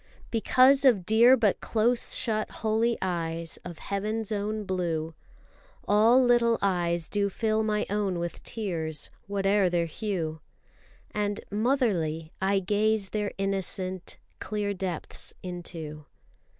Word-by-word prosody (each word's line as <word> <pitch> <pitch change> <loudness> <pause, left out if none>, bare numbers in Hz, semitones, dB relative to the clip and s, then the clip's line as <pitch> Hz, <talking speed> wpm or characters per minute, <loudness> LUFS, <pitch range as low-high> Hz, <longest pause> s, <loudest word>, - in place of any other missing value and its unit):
Because 255 +4 +4
of 230 -10 +4
dear 235 +5 +6
but 215 -5 +1
close 235 +2 +1
shut 215 -2 -1 0.2
holy 225 +2 +2
eyes 165 -2 -3
Of 175 -2 -8
heaven's 210 +3 -3
own 210 +1 -2
blue, 170 -4 -2 0.7
All 225 +5 +5
little 240 -2 +4
eyes 175 -4 0
do 200 -1 0
fill 220 +2 0
my 215 -1 0
own 200 -3 -1
with 170 0 -4
tears, 165 -8 -3 0.2
Whate'er 200 -1 +2
their 175 -1 +1
hue. 165 -3 -3 0.7
And, 205 -1 -1
motherly, 200 - 0
I 195 +1 +2
gaze 205 +1 +1
their 210 -1 -2
innocent, 190 -2 -2 0.2
Clear 205 -1 -2
depths 185 -4 -4
into. 165 -4 -7
200 Hz, 120 wpm, -27 LUFS, 175-220 Hz, 0.7 s, dear